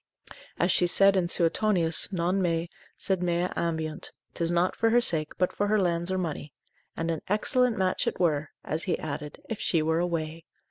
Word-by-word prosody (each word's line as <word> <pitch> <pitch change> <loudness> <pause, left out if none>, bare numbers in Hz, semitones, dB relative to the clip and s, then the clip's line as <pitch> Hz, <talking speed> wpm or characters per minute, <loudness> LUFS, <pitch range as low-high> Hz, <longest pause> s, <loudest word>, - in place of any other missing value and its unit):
As 175 - +2
she 175 - +3
said 195 +2 +5
in 180 -2 +1
Suetonius, 170 0 +2
non 180 +1 0
me, 170 -1 -1 0.3
sed 190 -2 -1
mea 175 0 0
ambiunt, 160 -2 -3 0.2
'tis 165 -1 -1
not 175 +1 +1
for 225 - +2
her 240 +2 +5
sake, 160 -9 0
but 180 - 0
for 205 - -1
her 215 +1 +2
lands 175 -1 0
or 190 - 0
money; 155 -5 -4 0.4
and 165 0 -1
an 160 - -3
excellent 245 +4 +2
match 185 -1 0
it - - -2
were 155 -4 +1
(as 155 +2 -1
he 180 - 0
added) 150 -1 -6
if 225 - -5
she 165 -3 +1
were 160 +1 +1
away. 165 -2 -3
175 Hz, 190 wpm, -27 LUFS, 165-190 Hz, 0.4 s, said